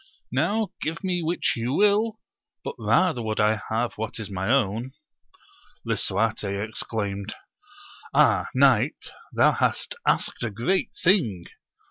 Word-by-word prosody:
now 215 -1 +1
give 165 +5 -3
me 180 -2 0
which 170 +2 0
you 120 +2 -2
will, 210 +4 +2 0.4
but - - -4
rather 165 -10 +2
would 110 -1 -2
I 105 0 +2
have 115 +2 -1
what 110 - -3
is 105 -2 -5
my 95 +2 -2
own. 120 0 +1 0.9
Lisuarte 105 0 -1
exclaimed. 105 -2 -3 0.8
Ah, - - +4
knight, - - +3 0.2
thou - - +4
hast - - 0
asked - - +1
a 120 - -1
great 120 - 0
thing 150 - +3
115 Hz, 125 wpm, -25 LUFS, 105-175 Hz, 0.9 s, Ah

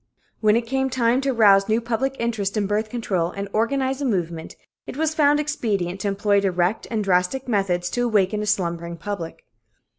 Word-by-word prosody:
When 215 -1 +3
it 235 - +1
came 265 +2 -1
time 245 0 +1
to 275 - -1
arouse 205 -5 +4
new 220 +1 +3
public 240 +3 -2
interest 220 -3 -2
in 205 - +1
birth 210 +2 -1
control 195 -8 -1
and 200 +2 -5
organize 265 +4 0
a - - -1
movement, 170 -8 -2 0.3
it - - -7
was 315 0 0
found 295 -1 +3
expedient 205 - -2
to 205 - -1
employ 200 0 +2
direct 185 +1 0
and 220 -3 -1
drastic 190 +8 0
methods 195 -6 0
to 245 - -1
awaken 210 -2 +1
a 210 - -3
slumbering 170 -4 -1
public. 165 -3 -6
210 Hz, 185 wpm, -23 LUFS, 190-245 Hz, 0.3 s, arouse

